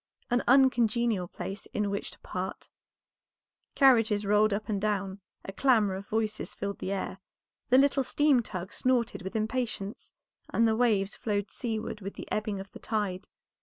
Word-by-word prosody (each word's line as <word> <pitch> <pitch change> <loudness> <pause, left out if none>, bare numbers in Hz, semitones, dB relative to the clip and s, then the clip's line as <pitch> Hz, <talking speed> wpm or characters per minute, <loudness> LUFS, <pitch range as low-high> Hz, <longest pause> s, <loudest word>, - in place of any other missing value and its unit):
An 245 0 +3
uncongenial 235 -6 +3
place 195 +3 -6
in 205 -1 0
which 200 - -3
to - - -14
part; - - -5 1.1
carriages 225 -6 +4
rolled 210 +1 +4
up 200 +1 -2
and 205 -3 -1
down, 200 -2 -1 0.3
a 195 - -6
clamor 220 -4 +3
of 195 +1 -6
voices 215 -1 -2
filled 200 0 -4
the 190 - -3
air, 195 -1 -3 0.5
the 255 - +6
little 275 0 +4
steamtug 240 - +1
snorted 245 -4 +1
with 190 +4 -7
impatience, 220 -1 -3 0.4
and 230 0 +3
the 220 - +2
waves 215 -4 +2
flowed 205 -2 -2
seaward 220 -2 -3
with 195 +1 -6
the - - -8
ebbing 210 -2 -1
of 195 0 -9
the - - -11
tide. 205 -4 -2
215 Hz, 160 wpm, -29 LUFS, 200-240 Hz, 1.1 s, the